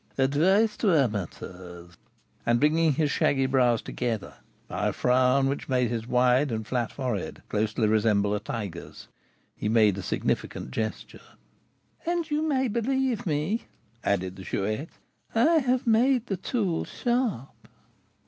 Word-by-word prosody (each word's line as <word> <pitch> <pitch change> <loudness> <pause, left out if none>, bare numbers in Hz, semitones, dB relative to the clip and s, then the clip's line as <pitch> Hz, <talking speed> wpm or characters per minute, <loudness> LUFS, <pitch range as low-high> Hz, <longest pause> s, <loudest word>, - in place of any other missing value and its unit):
"Advice 180 +11 +3
to 195 -7 +3
amateurs!" 90 - -4 0.5
And 120 0 +2
bringing 155 +2 +3
his 150 +1 0
shaggy 135 -1 +2
brows 125 -3 +2
together, 115 -4 -3 0.3
by - - -2
a - - 0
frown 130 +2 +3
which 140 +1 -3
made 125 -2 +1
his 115 -1 -3
wide 125 +2 +3
and 110 -1 -3
flat 120 +1 -2
forehead 125 -8 -4
closely 110 +1 0
resemble 105 -1 +2
a 105 - 0
tiger's, 100 -5 -7 0.5
he 105 - -2
made 110 -3 +4
a - - -3
significant 65 - -2
gesture. 110 - -4 0.8
"And 340 -2 -2
you 300 +1 +1
may 275 -4 +1
believe 245 0 -1
me," 160 +9 -1 0.4
added 95 -2 -1
the 95 - -9
Chouette, 110 - -2 0.5
"I 315 +9 +5
have 255 -2 0
made 240 +2 +3
the 195 -5 -3
tool 190 -3 -1
sharp." 240 - -2
130 Hz, 140 wpm, -27 LUFS, -, 0.8 s, I